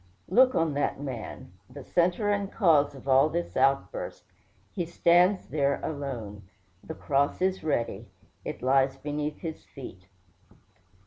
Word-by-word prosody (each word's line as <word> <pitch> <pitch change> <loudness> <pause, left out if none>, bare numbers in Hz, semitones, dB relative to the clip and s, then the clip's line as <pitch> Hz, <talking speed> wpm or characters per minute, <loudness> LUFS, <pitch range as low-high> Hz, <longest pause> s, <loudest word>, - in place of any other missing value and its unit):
Look 255 +1 +5
on 165 -2 +1
that 145 -1 -1
man 130 -9 -7 0.2
the 135 +2 -10
centre 180 - +1
and 200 -1 -1
cause 150 -8 +3
of 135 0 -12
all 135 +3 +5
this 170 +2 -3
outburst! 140 - 0 0.5
He 180 - -2
stands 175 +3 +3
there 140 -2 +1
alone. 125 -9 -5 0.4
The 160 - -7
cross 140 -1 0
is 190 -1 0
ready. 140 -7 -2 0.4
It - - -6
lies 135 +1 +3
beneath 150 +1 -4
his 160 -2 -6
feet. 95 -9 -11
145 Hz, 135 wpm, -28 LUFS, 135-175 Hz, 0.5 s, Look